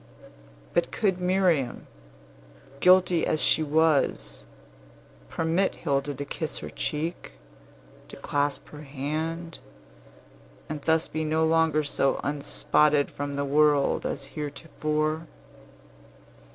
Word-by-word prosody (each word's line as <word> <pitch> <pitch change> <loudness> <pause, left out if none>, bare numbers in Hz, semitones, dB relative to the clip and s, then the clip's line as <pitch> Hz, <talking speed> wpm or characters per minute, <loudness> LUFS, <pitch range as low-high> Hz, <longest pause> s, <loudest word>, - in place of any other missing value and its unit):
But - - +1
could 190 -4 0
Miriam, 180 -8 +1 0.9
guilty 180 -1 +5
as 155 - +1
she 160 - +3
was, 155 - +1 0.8
permit 165 +4 0
Hilda 140 -2 -1
to 145 +2 -5
kiss 155 +2 -4
her - - -7
cheek, 160 +3 -4 0.7
to - - -11
clasp 145 0 -2
her 150 - -10
hand, 155 +4 -4 1.1
and 155 -1 -5
thus 160 +2 +2
be 155 0 -3
no 160 +1 +1
longer 160 -1 +2
so 135 -2 0
unspotted 145 0 +1
from 145 0 -4
the 140 0 -1
world 145 0 +3
as 140 - -3
heretofore. 155 +1 -3
155 Hz, 105 wpm, -26 LUFS, 145-165 Hz, 1.1 s, guilty